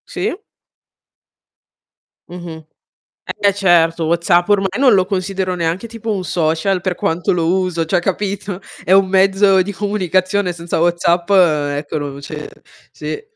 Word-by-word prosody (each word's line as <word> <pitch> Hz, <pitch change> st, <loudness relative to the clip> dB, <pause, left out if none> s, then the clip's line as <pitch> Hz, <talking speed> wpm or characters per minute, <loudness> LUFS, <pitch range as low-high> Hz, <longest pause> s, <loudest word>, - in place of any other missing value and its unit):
Sì. -, -, -3 dB, 1.9 s
Mh-mh. 170 Hz, -3 st, -9 dB, 0.8 s
Eh, 200 Hz, -1 st, +3 dB
certo, 170 Hz, -4 st, +2 dB
WhatsApp 170 Hz, +2 st, +2 dB
ormai 200 Hz, -2 st, +2 dB
non 260 Hz, -4 st, +5 dB
lo 185 Hz, -1 st, +3 dB
considero 190 Hz, 0 st, -2 dB
neanche 170 Hz, +5 st, -2 dB
tipo 225 Hz, -1 st, -5 dB
un 195 Hz, -3 st, -2 dB
social 175 Hz, +2 st, 0 dB
per 185 Hz, 0 st, -2 dB
quanto 175 Hz, -3 st, -1 dB
lo 170 Hz, -2 st, 0 dB
uso, 175 Hz, -3 st, -1 dB
cioè 160 Hz, -, +1 dB
capito, 195 Hz, 0 st, -3 dB, 0.2 s
è -, -, -2 dB
un 195 Hz, 0 st, +5 dB
mezzo 195 Hz, 0 st, +4 dB
di 195 Hz, +3 st, -3 dB
comunicazione 190 Hz, -1 st, 0 dB
senza 170 Hz, -1 st, -4 dB
WhatsApp, 170 Hz, +1 st, +1 dB
ecco 150 Hz, -6 st, +2 dB
non 140 Hz, -1 st, -6 dB
c'è 150 Hz, +1 st, -7 dB, 0.4 s
sì. 435 Hz, -, -6 dB
180 Hz, 135 wpm, -17 LUFS, 165-195 Hz, 1.9 s, non